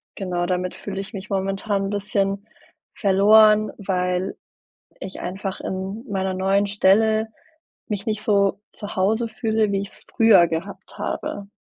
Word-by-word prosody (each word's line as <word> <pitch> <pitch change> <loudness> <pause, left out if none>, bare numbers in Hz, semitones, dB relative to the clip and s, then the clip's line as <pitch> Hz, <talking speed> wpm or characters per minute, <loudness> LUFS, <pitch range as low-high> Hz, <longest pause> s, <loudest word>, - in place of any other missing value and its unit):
genau, 180 -2 -2
damit 180 0 -2
fühle 195 -1 -5
ich 200 - -10
mich 195 0 -7
momentan 195 +1 -1
'n - - -4
bisschen 200 0 -1 0.5
verloren, 210 +1 +5
weil 180 -1 -1 0.6
ich 185 0 -7
einfach 190 +1 -5
in 190 +4 -4
meiner 190 -1 -1
neuen 195 +2 +2
Stelle 215 +2 +3 0.6
mich 205 -3 -4
nicht 215 -1 -2
so 200 -2 +2
zu 205 -1 -8
Hause 220 +5 +1
fühle, 220 -1 0
wie 195 0 0
ich's 200 - -10
früher 225 -7 +6
gehabt 190 +4 -6
habe. 200 -1 -4
200 Hz, 140 wpm, -22 LUFS, 190-210 Hz, 0.6 s, früher